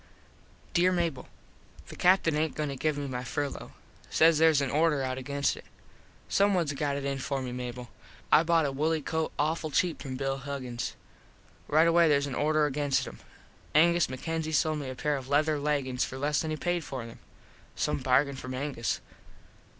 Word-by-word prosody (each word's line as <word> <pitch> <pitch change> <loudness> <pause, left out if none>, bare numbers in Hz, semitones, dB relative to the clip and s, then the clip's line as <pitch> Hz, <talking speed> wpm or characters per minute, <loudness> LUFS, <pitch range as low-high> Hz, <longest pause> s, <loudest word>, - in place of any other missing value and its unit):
_ - - -27
Dere 180 +1 +4
Mable: 170 -7 -1 0.6
The - - -9
Captin 180 -3 +3
aint 155 +1 0
goin 150 -1 -2
to 140 - -4
give 150 +2 -1
me 145 - -3
my 125 -2 -4
furlo. 140 +3 -4 0.4
Says 160 -1 +4
theres 160 -2 +5
an 140 -2 -1
order 150 -2 +2
out 130 0 -2
against 140 +2 -1
it. - - -12 0.6
Someones 185 -7 +2
got 140 0 -1
it 140 0 -4
in 140 -1 -2
for 135 +1 -2
me, 130 -1 -4
Mable. 125 0 -6 0.4
I - - +7
bought 165 -1 +3
a 140 - 0
wooley 155 +3 0
coat 160 +1 -1
awful 155 +1 0
cheap 170 +3 0
from 130 -3 -5
Bill 135 +1 -2
Huggins. 130 -3 -5 0.7
Right 160 +3 +4
away 170 -1 +5
theres 140 -1 +3
an 140 - -5
order 155 +2 +2
against 140 -2 0
em. - - -10 0.6
Angus 170 +2 +4
MacKenzie 160 +4 -3
sold 155 0 +1
me 140 -3 -5
a 130 - -6
pair 145 +3 0
of 130 -1 -8
leather 150 +1 +2
leggins 140 -3 0
for 130 - -5
less 145 +2 0
than 160 - -3
he 155 - -2
paid 175 +1 -1
for 130 -5 -6
them. 115 - -11 0.6
Some - - -1
bargain 135 +2 +2
from 130 0 -6
Angus. 130 -4 -2
145 Hz, 190 wpm, -29 LUFS, 135-160 Hz, 0.7 s, I